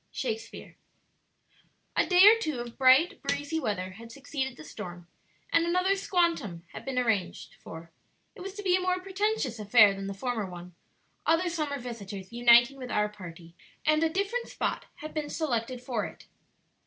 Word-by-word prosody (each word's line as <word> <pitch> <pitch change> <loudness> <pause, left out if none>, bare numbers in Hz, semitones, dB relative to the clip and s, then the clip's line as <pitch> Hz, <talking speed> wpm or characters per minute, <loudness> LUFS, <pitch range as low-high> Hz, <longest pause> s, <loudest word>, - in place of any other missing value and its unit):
Shakespeare. 450 -1 -5 1.2
A - - +2
day 365 +1 +7
or 430 +2 +10
two 310 - -2
of 240 -1 -7
bright, 270 +9 +5
breezy 290 +3 -2
weather 185 -8 -2
had 230 +5 -12
succeeded 265 -1 -4
the 155 - -10
storm, 175 +3 -8 0.5
and 335 - +5
another 365 +3 +2
"squantum" 335 - 0
had - - -8
been 270 -1 -4
arranged 220 -7 -1
for; 165 +1 -10 0.4
it 435 - -12
was 390 +1 -7
to 410 - -7
be 365 -2 +3
a 370 - +1
more 365 0 0
pretentious 385 - -1
affair 210 -1 +6
than 195 0 -6
the 195 - -5
former 225 -3 -3
one, 175 0 -10 0.5
other 335 +2 +3
summer 305 -4 -2
visitors 210 -5 -8
uniting 240 +2 +5
with 255 -2 -7
our 210 -2 +1
party; 170 -4 -11 0.3
and 310 0 +3
a 325 - +3
different 400 +7 -2
spot - - -3
had 310 +1 -9
been 300 -2 -3
selected 250 -5 -2
for 250 -1 -2
it. - - -14
260 Hz, 170 wpm, -28 LUFS, 210-345 Hz, 1.2 s, or